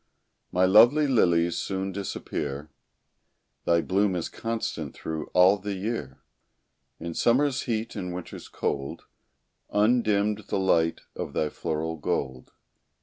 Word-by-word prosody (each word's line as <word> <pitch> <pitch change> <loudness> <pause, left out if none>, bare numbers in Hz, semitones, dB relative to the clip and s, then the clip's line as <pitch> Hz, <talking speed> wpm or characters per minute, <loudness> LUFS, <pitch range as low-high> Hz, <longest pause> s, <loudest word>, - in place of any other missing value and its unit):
My 90 +1 +3
lovely 120 +10 +6
lilies 85 - +3
soon 95 0 -3
disappear; 75 -7 -4 0.9
Thy 85 0 +3
bloom 95 +1 +1
is 85 - -3
constant 115 0 -4
through 80 -1 -5
all 95 +3 +5
the 100 0 -4
year; 95 - -4 0.8
In 85 0 -5
summer's 130 - +2
heat 115 0 -2
and 90 -1 -4
winter's 90 0 -7
cold, 70 0 -3 0.7
Undimmed 105 -1 +2
the - - -1
light 85 -4 +2
of - - -5
thy 75 - 0
floral 80 +2 -3
gold. 65 -3 -3
95 Hz, 120 wpm, -26 LUFS, 80-110 Hz, 0.9 s, lovely